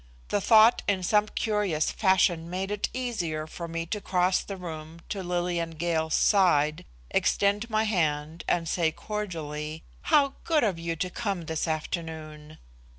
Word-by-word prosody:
The 205 - +1
thought 220 +2 +6
in 190 -2 +1
some 210 +3 +3
curious 205 -9 0
fashion 180 -4 +2
made 190 +2 -3
it 210 -1 -1
easier 180 -12 -3
for 170 +2 -7
me 165 0 -3
to 210 +5 -4
cross 180 -1 +2
the 195 - -7
room 165 -2 -8
to 200 - -3
Lillian 175 -2 -2
Gale's 160 -1 0
side, 155 -7 +3 0.3
extend 205 +3 +1
my 215 0 +2
hand 160 -6 -1
and 170 -1 +1
say 165 -1 +1
cordially: 160 -6 -5 0.3
"How 285 -3 +4
good 315 -3 +2
of 195 -7 0
you 165 0 -2
to 180 +3 -3
come 200 -6 -2
this 160 +1 -2
afternoon!" 155 -1 -5
175 Hz, 150 wpm, -27 LUFS, 160-205 Hz, 0.3 s, thought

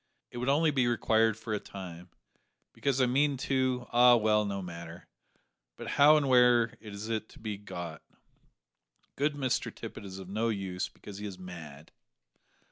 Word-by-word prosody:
It 120 - -6
would 125 +2 -1
only 155 +3 +3
be 130 -4 +2
required 110 -2 +2
for 110 -1 -5
a 105 - 0
time, 90 -3 -9 0.6
because 140 -2 0
I 130 - +5
mean 140 +3 +2
to 130 -1 0
ah, 120 0 +7
well, 105 -2 +3
no 100 -1 -3
matter 85 -2 -8 0.7
but - - -7
how 150 +2 +6
and 145 -2 +1
where 125 -2 +5
is 105 -1 -7
it 110 -1 -3
to - - -16
be 110 -2 -4
got? 90 -4 -7 1.1
Good 145 +1 0
Mr 135 -3 -1
Tippet - - -9
is 95 -1 -8
of 95 -1 -9
no 110 +4 -1
use, 95 -4 -3
because 100 -1 -11
he 105 - -5
is 95 -2 -8
mad." 80 -5 -10
110 Hz, 170 wpm, -30 LUFS, 95-125 Hz, 1.1 s, ah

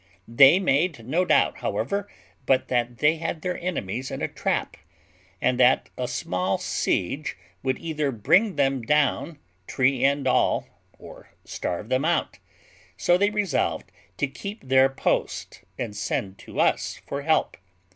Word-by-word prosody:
They 135 +8 +7
made 155 -7 0
no 170 +7 +1
doubt, - - +3
however, 200 0 -2 0.4
but 130 -1 +2
that 120 -1 -1
they 155 +4 +3
had 160 0 -4
their 180 0 -1
enemies 130 - -3
in - - -5
a - - +1
trap, - - -2 0.6
and 125 0 +1
that 125 +1 +4
a 125 - -3
small 95 -6 -1
siege 135 +8 -2 0.2
would 130 -1 -1
either 155 -3 -2
bring 180 - +2
them 135 -2 +1
down, 150 +4 +1 0.3
tree 130 0 +1
and 140 0 +2
all, - - +2 0.3
or - - -13 0.2
starve 95 +6 -4
them 130 +2 +1
out; 165 - 0 0.6
so 175 - +3
they 200 +3 +3
resolved 210 -4 -1 0.3
to - - +1
keep 200 - -8
their 130 0 +4
post, 135 - -2
and 115 -4 -4
send 95 -1 -3
to - - -8
us - - +1
for 140 - -4
help. 155 +2 +1
135 Hz, 145 wpm, -25 LUFS, 125-165 Hz, 0.6 s, They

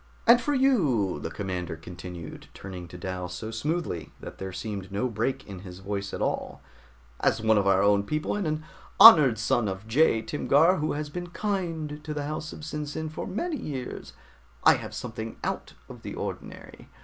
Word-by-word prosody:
"And 240 +1 +7
for 290 +4 0
you," 150 - +2
the 80 - -4
commander 90 -2 -4
continued, 85 -1 -9
turning 90 -2 -8
to 90 - -10
Dal 90 0 -4
so 110 +5 -6
smoothly 145 - -2
that - - -10
there 95 0 -5
seemed 100 -1 -5
no 105 +6 0
break 125 +4 -2
in 95 -3 -8
his 90 -1 -10
voice 100 +1 -4
at - - -3
all, - - -2 0.6
"as - - +2
one 110 0 +3
of 100 - 0
our 95 0 +4
own 100 0 +4
people, 155 - -2
and 205 -5 -1
an 155 0 -2 0.4
honored 150 - +10
son 115 +1 +1
of 95 +2 -4
Jai 115 -1 +3
Timgar, 155 +7 +3
who 155 +1 -1
has 150 0 -4
been 175 +2 -5
kind 165 -7 -3
to 150 -1 -5
the 145 -1 -2
house 155 +1 -4
of - - -9
SinSin 150 +1 -4
for - - -5
many 300 - -2
years, 130 - -6 0.5
I - - +8
have - - -8
something 110 -2 -6
out - - -3
of - - -11
the - - -6
ordinary. - - -7
120 Hz, 185 wpm, -27 LUFS, 95-155 Hz, 0.6 s, honored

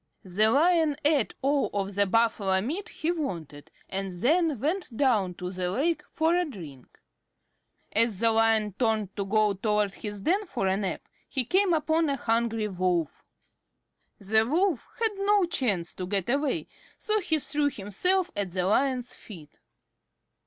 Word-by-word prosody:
The 205 +3 +2
Lion 315 +3 +3
ate 290 -6 +2
all 280 +1 +2
of 200 0 -2
the 200 +1 +2
Buffalo 205 -3 +2
meat 330 - -4
he 320 +2 -2
wanted, 170 - -5 0.2
and 195 0 -3
then 295 - +1
went 305 - -2
down 215 -10 +2
to 180 +1 -5
the 180 -1 -3
lake 300 - 0
for 320 +2 +1
a 360 - +2
drink. 165 - -11 0.9
As 225 -2 +3
the 230 0 +4
Lion 225 -2 +2
turned 220 -5 0
to 200 - -2
go 210 +1 +2
toward 210 0 0
his 205 -1 -7
den 385 - 0
for 240 -11 -3
a 190 0 +2
nap, 195 -2 -4 0.2
he 260 -3 -1
came 380 - +2
upon 315 0 +1
a 280 - 0
hungry 225 -3 0
Wolf. 180 -4 -1 0.9
The 220 +2 +3
Wolf 330 -1 +1
had 450 -1 +2
no 400 -1 +3
chance 215 - -1
to 185 - -6
get 195 +2 0
away, 280 +1 0 0.3
so 430 -1 0
he 325 -5 0
threw 290 0 0
himself 360 - 0
at 200 -2 -2
the 180 0 -2
Lion's 250 +4 0
feet. 160 -8 -13
225 Hz, 160 wpm, -27 LUFS, 195-310 Hz, 0.9 s, the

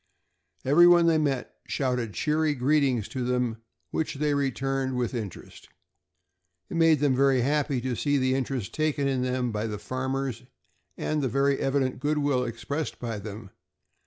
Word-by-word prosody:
Every 160 +6 +7
one 175 -1 +6
they 165 -1 +4
met 140 -4 -2
shouted 125 -7 -1
cheery 155 - +1
greetings 130 -4 +2
to 130 - -3
them, 125 -2 0 0.3
which 160 - -2
they 150 +1 0
returned 135 -1 -1
with 125 0 -1
interest. 110 -7 -7 1.0
It - - -2
made 165 -2 +4
them 140 -3 +3
very 135 -1 +3
happy 140 0 +1
to 125 0 -2
see 145 +4 +1
the 130 -1 +1
interest 130 -5 -2
taken 155 -3 0
in 135 -2 0
them 125 -1 -1
by 105 +1 -2
the 105 -1 -4
farmers, 130 +1 -3 0.6
and 155 -1 -1
the 130 - 0
very 140 +3 +2
evident 135 -2 0
good 150 +3 0
will 140 -3 +1
expressed 125 +6 -4
by 115 -3 -4
them. 105 0 -8
135 Hz, 160 wpm, -27 LUFS, 125-145 Hz, 1.0 s, Every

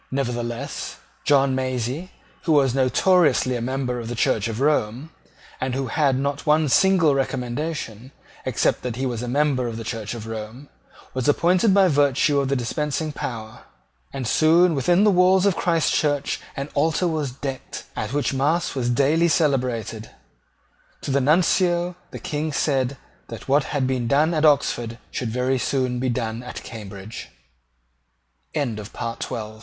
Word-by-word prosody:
Nevertheless 120 -1 -3 0.3
John 140 -2 +4
Massey, 130 +5 -2 0.4
who 165 - +3
was 135 -4 +4
notoriously 135 0 +3
a 120 - -3
member 125 0 -2
of 115 - -6
the 120 - -4
Church 110 -2 +1
of 115 0 -4
Rome, 140 0 0 0.5
and 130 -1 -2
who 135 0 -1
had 140 -1 +2
not 140 +2 -2
one 150 0 +3
single 180 -1 +4
recommendation, 130 -2 -3 0.3
except - - 0
that 125 -3 -4
he 130 +2 -2
was 120 -3 -2
a 125 - -4
member 135 -1 +1
of 115 -1 -5
the 115 - -5
Church 110 0 -4
of 115 -2 -7
Rome, 110 +5 -7 0.4
was 130 -2 -2
appointed 180 +7 +3
by 195 -2 +6
virtue 145 -1 +3
of 140 - 0
the 140 - +1
dispensing 150 +5 -2
power; 110 -6 -6 0.5
and 135 -2 -4
soon 165 +6 +4
within 175 +7 +3
the 210 - +5
walls 185 +1 +4
of 200 -3 +3
Christchurch 155 -4 +1 0.2
an 140 +1 -4
altar 160 +4 +1
was 155 -4 -1
decked, 135 0 -6
at 110 +1 -3
which 145 0 0
mass 150 +6 +1
was 125 -3 -1
daily 145 +7 +3
celebrated. 125 -8 0 0.9
To - - -4
the 140 +1 +2
Nuncio 175 +4 +2
the - - -8
King 155 +1 -3
said 135 -2 0 0.3
that 115 - -9
what 140 +1 +3
had 145 -3 -1
been 130 -2 -1
done 150 +6 +3
at 155 -1 +2
Oxford 120 -5 +2
should 120 - -3
very 125 +3 0
soon 125 -2 -1
be 130 +1 0
done 115 -2 -2
at 125 0 -8
Cambridge. 105 -1 -9
135 Hz, 155 wpm, -23 LUFS, 120-155 Hz, 0.9 s, by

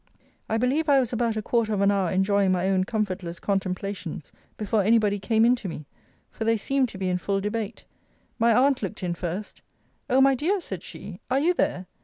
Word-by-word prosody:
I 220 - +1
believe 275 +7 +1
I 280 -1 +6
was 250 -2 -1
about 230 -2 0
a 215 - -2
quarter 225 -2 +1
of 200 - 0
an 200 0 +4
hour 195 -3 +1
enjoying 190 +1 +2
my 185 0 +1
own 185 -1 +2
comfortless 190 -5 -3
contemplations, 190 -4 -3 0.3
before 210 0 +1
any 220 +4 +4
body 205 -2 +1
came 220 +3 +2
in 245 +1 +5
to 215 - -6
me; 155 -2 -7 0.5
for - - -5
they 225 0 +2
seemed 265 +4 0
to 200 - -9
be 190 -1 -2
in 180 0 0
full 195 +1 -1
debate. 210 +2 -4 0.5
My 230 +1 +4
aunt 260 +3 +3
looked 205 -1 -5
in 175 -1 -1
first; 180 +4 -5 0.5
O 260 +1 +4
my 270 0 +6
dear, 335 +10 0
said 190 - -6
she, 195 -1 -9
are 260 +2 +2
you 340 +5 +3
there? 185 - -1
210 Hz, 215 wpm, -25 LUFS, 190-235 Hz, 0.5 s, I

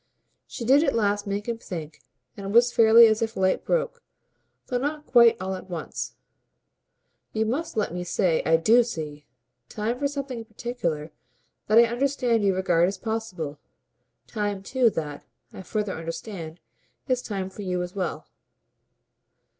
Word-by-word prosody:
She 235 - -6
did 275 +5 +5
at - - +1
last 205 -1 +1
make 200 +2 -3
him 230 -1 -2
think, 165 -7 -7 0.3
and 200 - -8
it 195 - -4
was 240 +2 +5
fairly 230 +1 +8
as 220 0 +2
if 225 0 -2
light 190 0 +1
broke, - - -1 0.6
though 250 - -1
not 295 +3 -3
quite 235 -2 +6
all 190 +1 -3
at 190 0 -8
once. 170 -3 -5 1.2
"You 220 0 +1
must 275 +5 -3
let 210 -5 0
me 180 0 -3
say 175 -1 +1
I 165 0 +4
DO 225 +9 +5
see. 150 -9 -6 0.4
Time 225 +4 -2
for 285 - +1
something 275 -3 -5
in 225 - -8
particular 190 -9 -4 0.6
that 215 - +4
I 235 - +9
understand 240 -1 +1
you 195 -2 +3
regard 175 -2 +3
as 195 +1 -3
possible. 190 -10 -4 0.7
Time 205 -3 -3
too 250 +3 +3
that, 150 -7 -5 0.3
I - - -8
further 210 0 -3
understand, 165 0 -7 0.5
is 255 -2 +1
time 190 -4 -4
for 205 - -9
you 180 -2 -1
as 180 0 -7
well." 185 -5 -3
210 Hz, 160 wpm, -25 LUFS, 180-235 Hz, 1.2 s, I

